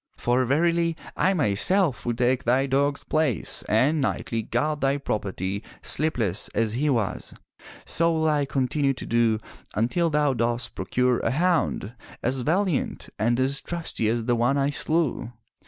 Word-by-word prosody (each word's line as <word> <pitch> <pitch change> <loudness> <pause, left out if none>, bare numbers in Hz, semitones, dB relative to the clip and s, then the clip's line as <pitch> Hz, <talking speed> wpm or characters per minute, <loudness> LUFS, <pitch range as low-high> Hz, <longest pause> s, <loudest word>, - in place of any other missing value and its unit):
For 125 +2 +1
verily 165 +4 +1 0.2
I 190 +1 +2
myself 135 - +2
will 120 - 0
take 125 +2 +1
thy 130 +3 +2
dog's 140 +1 0
place 155 -7 -1
and 140 +8 +3
nightly 115 -3 -1
guard 150 +7 -1
thy 135 +1 +2
property, 100 -6 -3 0.2
sleepless, 115 - 0
as 115 0 +1
was 125 -7 -1
he. - - -17 0.5
So 165 0 +2
will 160 -1 +1
I 150 -2 +2
continue 135 +1 0
to - - -7
do 115 -1 +2 0.4
until 125 - +1
thou 150 -2 +2
dost 120 0 -1
pro - - -5
cure 125 -1 +1
a - - 0
hound 160 - 0 0.3
as 130 +1 0
valiant 175 +3 -1
and 120 +3 +1
as 135 +1 +1
trusty 165 -10 -2
as 115 0 -1
the 120 0 +2
one 120 +4 +2
I 140 +1 +1
slew. 145 -6 -1
135 Hz, 155 wpm, -25 LUFS, 120-155 Hz, 0.5 s, and